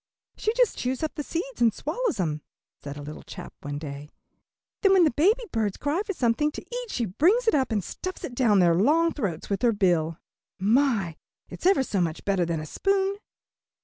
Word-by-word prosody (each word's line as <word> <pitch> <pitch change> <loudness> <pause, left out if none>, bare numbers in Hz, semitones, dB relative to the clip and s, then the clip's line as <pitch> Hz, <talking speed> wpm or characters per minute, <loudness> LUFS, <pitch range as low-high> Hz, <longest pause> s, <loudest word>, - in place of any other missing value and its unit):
"She 435 - 0
just - - +2
chews 255 +4 -2
up 310 - -2
the - - -4
seeds 355 - -5
and 230 -1 +5
swallows 350 - -2
'em," 155 -4 -1 0.4
said 145 0 -7
a 145 - -7
little 150 +1 -8
chap - - -10
one 145 0 -5
day, 145 -1 -7 0.7
"then 390 -2 +5
when 375 -2 +6
the 315 - +4
baby 405 - +3
birds 215 -4 -1
cry 295 +6 0
for 405 - -3
something 285 +1 +1
to - - -8
eat - - -4
she 240 - -1
brings 360 - +2
it - - +4
up 265 -5 +1
and 210 -3 0
stuffs 370 - -6
it 245 - -5
down 235 -5 +3
their 175 -2 +5
long 305 - +3
throats 195 - -3
with 200 -1 -2
her 240 -2 +3
bill. 170 -5 +1 0.4
My! 210 - +2 0.3
it's - - -2
ever 375 -8 +4
so 200 -7 -1
much 165 -2 -2
better 195 -3 +2
than 165 -2 -1
a 155 - -5
spoon." 390 - 0
240 Hz, 210 wpm, -26 LUFS, -, 0.7 s, when